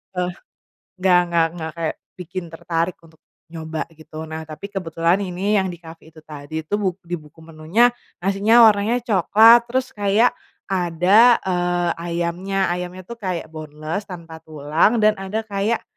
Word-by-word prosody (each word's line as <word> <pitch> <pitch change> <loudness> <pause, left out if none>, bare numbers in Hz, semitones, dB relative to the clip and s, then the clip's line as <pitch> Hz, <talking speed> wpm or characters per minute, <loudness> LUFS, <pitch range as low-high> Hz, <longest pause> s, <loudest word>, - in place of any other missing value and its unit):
eee, 180 0 -1 0.7
nggak 180 -2 +5
nggak 165 -1 +3
nggak 160 -1 -5
kayak 160 -2 -2 0.2
bikin 180 +1 -6
tertarik 165 +1 -2
untuk 160 -1 -20 0.3
nyoba 160 -1 -4
gitu 155 0 -10
nah 160 0 -6
tapi 160 +6 -9
kebetulan 170 -1 0
ini 195 +2 0
yang 190 - 0
di 175 - -9
cafe 165 -1 -13
itu 155 - -15
tadi 155 +1 -7
itu 200 - -4
buk 190 -2 -2
di 175 +1 -3
buku 150 +2 -18
menunya 165 +10 +2 0.3
nasinya 205 +5 +5
warnanya 215 +4 +1
coklat 225 +3 +6
terus 255 +1 -1
kayak 205 +3 +3 0.4
ada, 190 +6 +4
eee, 175 -1 0
ayamnya 175 +3 -2
ayamnya 180 +1 -5
tuh 235 +4 -10
kayak 180 -5 -3
boneless 155 +5 -6
tanpa 165 -3 -9
tulang 155 +8 +1
dan 215 - +6
ada 210 +3 -3
kayak, 210 +2 -1
180 Hz, 155 wpm, -21 LUFS, 160-200 Hz, 0.7 s, coklat